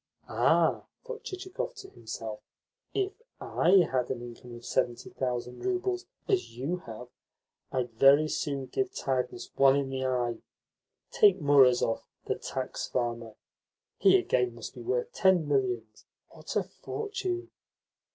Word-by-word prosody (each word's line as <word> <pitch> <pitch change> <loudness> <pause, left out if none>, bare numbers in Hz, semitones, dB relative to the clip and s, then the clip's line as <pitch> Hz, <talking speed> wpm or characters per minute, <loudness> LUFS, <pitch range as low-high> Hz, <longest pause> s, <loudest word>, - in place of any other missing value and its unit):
"Ah," - - +3 0.2
thought 485 -2 -7
Chichikov 385 +7 -5
to 390 -3 -11
himself, - - -6 0.5
"if 395 -1 0 0.3
I 180 0 +4
had 130 -2 0
an 120 -2 -3
income 120 0 -10
of 120 - -11
seventy 120 -2 -1
thousand 125 -1 -3
roubles, 370 -1 -1 0.2
as 375 - 0
you 145 +8 -1
have, 115 +2 -8 0.6
I'd 125 -2 -1
very 140 +6 +6
soon 140 -3 -2
give 390 - -2
tiredness 130 -2 -2
one 135 0 +6
in 140 -1 -1
the 130 0 -1
eye! 120 -2 0 0.7
Take 195 -2 +5
Murazov, 130 -6 +4 0.2
the - - 0
tax 130 -2 -4
farmer 120 -3 -2 0.6
he, - - +7
again, 125 -2 +1
must 115 -2 -8
be 125 - -9
worth 120 +1 -1
ten 185 -5 +3
millions. 125 -6 -1 0.2
What - - -8
a - - +3
fortune!" 375 -4 -4
135 Hz, 135 wpm, -29 LUFS, -, 0.7 s, he